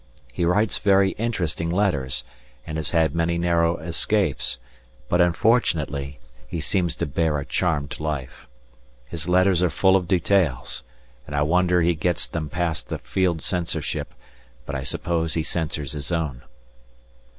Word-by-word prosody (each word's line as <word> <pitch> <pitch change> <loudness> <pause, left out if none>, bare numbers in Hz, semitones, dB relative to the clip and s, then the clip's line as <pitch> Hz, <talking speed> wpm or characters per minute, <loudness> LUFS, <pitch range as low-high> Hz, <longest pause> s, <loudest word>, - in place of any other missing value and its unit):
He 85 - 0
writes 105 +5 +2
very 100 -1 +4
interesting 85 -8 -1
letters, 85 -9 0 0.4
and 80 0 -4
has 75 - -2
had 80 -2 +2
many 85 +1 +1
narrow 85 -1 +2
escapes, 90 - 0 0.5
but 90 - +3
unfortunately 80 - +1 0.3
he 85 - -4
seems 85 +1 0
to - - -2
bear 75 +1 0
a 70 - -4
charmed 75 -6 -1
life. 75 -5 -4 0.6
His 80 +6 -5
letters 90 0 +4
are 90 - +3
full 95 +3 +4
of 90 -2 +1
details, 90 -6 +1 0.4
and 75 - -5
I 75 - +2
wonder 90 +2 +3
he 85 +1 +3
gets 85 +2 0
them 80 -2 -4
past 85 0 -2
the - - -2
Field 90 -4 0
Censorship, 85 -6 -2 0.5
but 70 - -5
I 65 - -2
suppose 80 +4 -1
he 80 - +1
censors 75 -4 -2
his 75 +1 -4
own. 80 -8 -1
85 Hz, 150 wpm, -24 LUFS, 75-90 Hz, 0.6 s, very